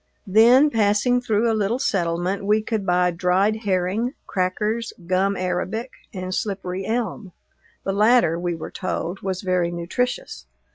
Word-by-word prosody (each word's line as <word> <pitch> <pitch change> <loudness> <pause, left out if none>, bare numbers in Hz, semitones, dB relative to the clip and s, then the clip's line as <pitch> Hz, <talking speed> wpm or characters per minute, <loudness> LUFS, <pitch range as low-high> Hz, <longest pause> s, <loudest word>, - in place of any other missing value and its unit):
Then 240 +8 +6
passing 225 +3 +2
through 225 -1 +1
a 225 - +2
little 215 +2 0
settlement 180 -3 -1
we 210 +2 +2
could 215 -3 -3
buy 180 0 +3
dried 185 +5 +1
herring, 205 +4 -1
crackers, 210 +5 -1
gum 190 +2 +1
arabic, 185 +7 -2 0.2
and 185 -2 -5
slippery 190 -3 -3
elm; 220 -4 -3 0.5
the 195 - -1
latter, 210 -5 +4
we 175 -1 -2
were 160 - -7
told, 185 0 -4
was 190 -1 -3
very 180 -2 +1
nutritious. 245 - -3
195 Hz, 140 wpm, -22 LUFS, 180-225 Hz, 0.5 s, Then